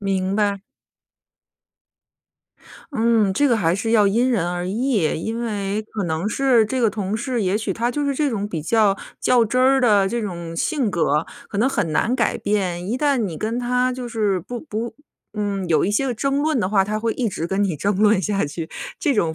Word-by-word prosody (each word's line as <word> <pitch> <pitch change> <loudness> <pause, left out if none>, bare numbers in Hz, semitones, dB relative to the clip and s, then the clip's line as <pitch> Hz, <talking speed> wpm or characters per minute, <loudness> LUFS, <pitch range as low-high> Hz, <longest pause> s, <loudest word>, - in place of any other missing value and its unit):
明 195 -1 -1
白。 200 -2 +1 2.3
嗯， 225 -5 +2
这 285 +8 +2
个 235 - +3
还 170 -4 +1
是 225 +3 -2
要 215 -3 +5
因 240 +6 +2
人 180 -8 +1
而 175 +1 -3
异。 235 +2 0 0.2
因 225 +1 -3
为 205 -2 -2
可 210 -3 -2
能 165 +4 -1
是 250 -1 +3
这 255 +3 -2
个 225 - +3
同 205 0 -3
事， 240 -1 -2
也 190 +2 +1
许 225 - -2
他 235 +1 -1
就 290 +4 -2
是 280 -1 0
这 295 +1 +1
种 205 -2 -2
比 165 -5 -3
较 205 +2 +3 0.2
较 245 -2 +4
真 250 +4 0
儿 265 +1 +4
的 205 -5 +4
这 235 +2 -2
种 170 -5 -5
性 255 - 0
格， 160 -3 +1 0.2
可 200 - -4
能 250 +5 +3
很 180 - -1
难 230 +10 +1
改 235 -4 +1
变。 185 -4 -1
一 240 - 0
旦 290 -2 +2
你 200 -10 -2
跟 225 +3 -2
他 250 +1 +1
就 250 -1 -5
是 210 -4 0
不 240 +7 -7
不 230 -5 -5 0.4
嗯， 205 -3 -2
有 160 - +3
一 195 - 0
些 270 +6 +1
个 250 - -1
争 275 +5 0
论 310 -4 +1
的 185 - 0
话， 195 -2 +3
他 215 +1 -2
会 225 0 -1
一 245 -3 -1
直 170 -4 -3
跟 195 +3 0
你 180 -6 -1
争 200 +6 0
论 210 -1 +4
下 200 -4 0
去， 160 +3 -5 0.3
这 295 -6 +1
种 165 -7 +1
215 Hz, 230 characters per minute, -21 LUFS, 195-240 Hz, 2.3 s, 要